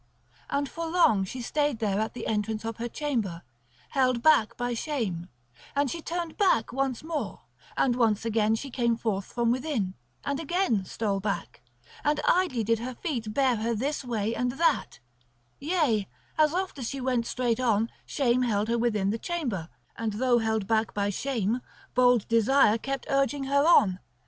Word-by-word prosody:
And 280 0 0
for 330 +4 -5
long 320 - +3
she 250 +6 -6
stayed 290 0 0
there 210 -3 0
at 220 +2 -2
the 235 - -5
entrance 215 +1 -1
of 225 0 -4
her 235 +1 -3
chamber, 225 - -2 0.5
held 255 -3 +1
back 235 -8 +4
by 245 0 -1
shame; 220 - -3 0.5
and 285 -2 +1
she 335 - -4
turned 340 0 -4
back 300 - +2
once 270 -1 -1
more; 315 -2 -4 0.4
and 245 -3 +3 0.3
again 220 -1 +2
she 270 +4 -6
came 235 -2 +1
forth 200 -4 -1
from 235 -1 0
within, 245 -7 -1 0.3
and 280 0 -1
again 325 - 0
stole 200 0 -1
back; 195 - -4 0.4
and 295 0 +2
idly 340 -11 +2
did 225 +1 +1
her 250 +2 -5
feet 235 -7 -3
bear 260 0 +2
her 230 +2 -1
this 280 +7 -2
way 225 -3 -1
and 245 +1 -1
that; 330 +4 +1 0.6
yea, 285 - +1 0.3
as 305 -1 +4
oft 370 -3 -2
as 240 - -3
she 275 - -4
went 250 -3 0
straight 240 -2 0
on, 225 -3 +2 0.2
shame 255 -3 +1
held 215 -3 +1
her 235 0 +1
within 210 -4 +1
the 225 - -3
chamber, 245 - -3 0.3
and 225 -2 -2
though 245 +2 +3
held 220 -2 0
back 220 0 0
by 205 0 0
shame, 235 0 -1 0.3
bold 245 -3 +4
desire 230 0 +4
kept 275 +2 -4
urging 275 +1 +1
her 280 +3 +2
on. 190 - +5
240 Hz, 175 wpm, -27 LUFS, 220-280 Hz, 0.6 s, on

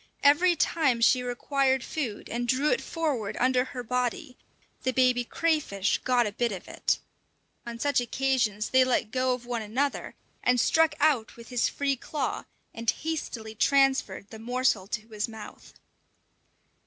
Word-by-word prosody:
Every 340 +5 +5
time 290 -6 +1
she 250 +2 +4
required 265 +1 0
food 245 -10 -4
and 240 +1 -3
drew 265 +5 +2
it 485 - +1
forward 285 - -2
under 255 0 +3
her 255 -2 -7
body, 250 +4 -2 0.5
the 255 - 0
baby 250 -1 +3
crayfish 280 - 0
got 250 -2 +2
a 210 - -2
bit 235 +2 -1
of 190 -3 -7
it. - - 0 0.7
On 235 0 -5
such 280 +1 +1
occasions 240 -4 0
they 260 0 +6
let 240 -4 0
go 255 0 +1
of 245 -1 -12
one 240 -1 -3
another, 255 +7 -2 0.3
and 250 0 +2
struck 320 +4 +3
out 250 -8 +2
with 235 -1 -13
his 245 -2 +1
free 280 -1 -1
claw, 275 +2 -4 0.3
and 230 0 -2
hastily 265 -9 -3
transferred 265 -5 +2
the 220 - -9
morsel 240 -4 0
to 215 +1 -5
his 215 0 -2
mouth. 220 -1 -11
250 Hz, 155 wpm, -27 LUFS, 230-275 Hz, 0.7 s, they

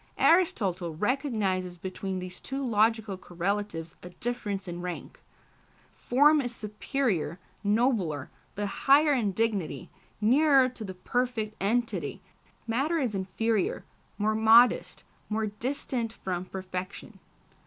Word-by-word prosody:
Aristotle 190 - +2
recognises 205 - -1
between 190 +1 -4
these 180 -1 -7
two 270 +1 -4
logical 220 -3 +2
correlatives 180 -2 -3
a 180 - -9
difference 205 -2 -4
in 175 0 -5
rank. 180 -1 -6 0.7
Form 290 +4 +4
is 245 -2 -4
superior, 210 - -2 0.3
nobler, 205 - +1 0.2
the 205 - -2
higher 285 +8 +4
in 225 -7 +1
dignity, 205 -4 -2 0.3
nearer 265 +4 +5
to 245 -3 -9
the 190 -3 -6
perfect 225 +2 -2
entity; 230 +4 -1 0.5
matter 270 +9 0
is 255 -8 0
inferior, 195 +2 -1 0.3
more 215 +1 +1
modest, 225 +3 +5 0.3
more 220 0 0
distant 235 +2 -3
from 185 -4 -4
perfection. 185 0 -6
215 Hz, 110 wpm, -28 LUFS, 185-245 Hz, 0.7 s, nearer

